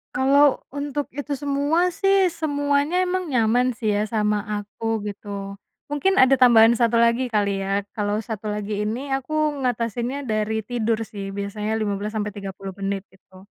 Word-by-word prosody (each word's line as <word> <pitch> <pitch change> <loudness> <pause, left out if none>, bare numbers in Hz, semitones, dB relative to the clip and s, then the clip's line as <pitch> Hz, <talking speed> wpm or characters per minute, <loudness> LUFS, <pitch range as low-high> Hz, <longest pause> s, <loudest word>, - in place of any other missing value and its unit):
Kalau 275 +2 +4
untuk 285 0 -4
itu 285 +1 -4
semua 290 +5 +1
sih 390 +1 +3
semuanya 290 +1 0
emang 370 0 -1
nyaman 245 -1 +2
sih 220 -2 -1
ya 210 +1 0
sama 210 -1 +1 0.2
aku 220 +1 -4
gitu, 200 -1 -7 0.3
mungkin 380 +7 +1
ada 265 -5 +5
tambahan 235 -3 +7
1 235 -1 +3
lagi 235 +2 +3
kali 205 -4 0
ya. 195 +1 -1
Kalau 205 -1 -1
1 215 0 -5
lagi 210 0 -2
ini 255 +6 -4
aku 270 +3 -2 0.3
ngatasinnya 240 +3 -2
dari 220 -2 -1
tidur 230 -1 -1
sih 200 -2 -7
biasanya 210 +2 -3
15-30 205 -2 -4
menit, 195 0 -2
gitu. 190 0 -19
225 Hz, 145 wpm, -23 LUFS, 210-280 Hz, 0.3 s, tambahan